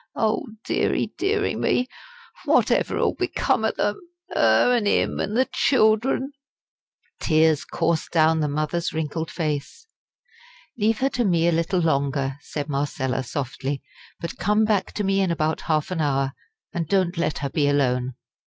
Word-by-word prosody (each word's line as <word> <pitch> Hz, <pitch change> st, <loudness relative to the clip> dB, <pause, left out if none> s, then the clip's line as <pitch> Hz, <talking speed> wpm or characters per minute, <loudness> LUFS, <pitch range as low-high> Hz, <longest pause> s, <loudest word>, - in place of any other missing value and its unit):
Oh, 225 Hz, +7 st, 0 dB, 0.2 s
deary, -, -, 0 dB
deary, 410 Hz, +2 st, +1 dB
me! 250 Hz, -, +1 dB, 0.6 s
whatever -, -, +2 dB
'ull -, -, +2 dB
become -, -, 0 dB
o' -, -, +3 dB
them -, -, -1 dB, 0.4 s
'er, 110 Hz, -, +4 dB
an' 220 Hz, -4 st, +1 dB
'im, -, -, +1 dB
an' 210 Hz, -, -2 dB
the 260 Hz, +2 st, +3 dB
children!" 250 Hz, +2 st, +2 dB, 0.9 s
The -, -, -6 dB
tears 155 Hz, -2 st, +4 dB
coursed 165 Hz, -1 st, -1 dB
down 160 Hz, -1 st, +3 dB
the 150 Hz, -, +1 dB
mother's 155 Hz, +4 st, -1 dB
wrinkled 160 Hz, +1 st, -3 dB
face. 155 Hz, -, -3 dB, 0.9 s
"Leave 220 Hz, 0 st, +1 dB
her 270 Hz, -, +3 dB
to 250 Hz, -3 st, -1 dB
me 170 Hz, -5 st, +2 dB
a -, -, +4 dB
little 170 Hz, +2 st, +1 dB
longer," 140 Hz, -3 st, 0 dB
said 145 Hz, -1 st, -5 dB
Marcella, 140 Hz, -2 st, -1 dB
softly; 135 Hz, +1 st, -4 dB, 0.4 s
"but 170 Hz, 0 st, -6 dB
come 210 Hz, +4 st, +2 dB
back 205 Hz, -3 st, 0 dB
to 210 Hz, -, -2 dB
me 195 Hz, 0 st, +2 dB
in 190 Hz, -, +1 dB
about 160 Hz, -1 st, 0 dB
half 155 Hz, +1 st, -1 dB
an 170 Hz, -3 st, -1 dB
hour, 135 Hz, -2 st, 0 dB, 0.4 s
and 170 Hz, -4 st, -2 dB
don't 185 Hz, 0 st, +1 dB
let 165 Hz, -3 st, -1 dB
her -, -, -1 dB
be 145 Hz, -2 st, +1 dB
alone." 130 Hz, -3 st, +1 dB
165 Hz, 160 wpm, -24 LUFS, 145-205 Hz, 0.9 s, er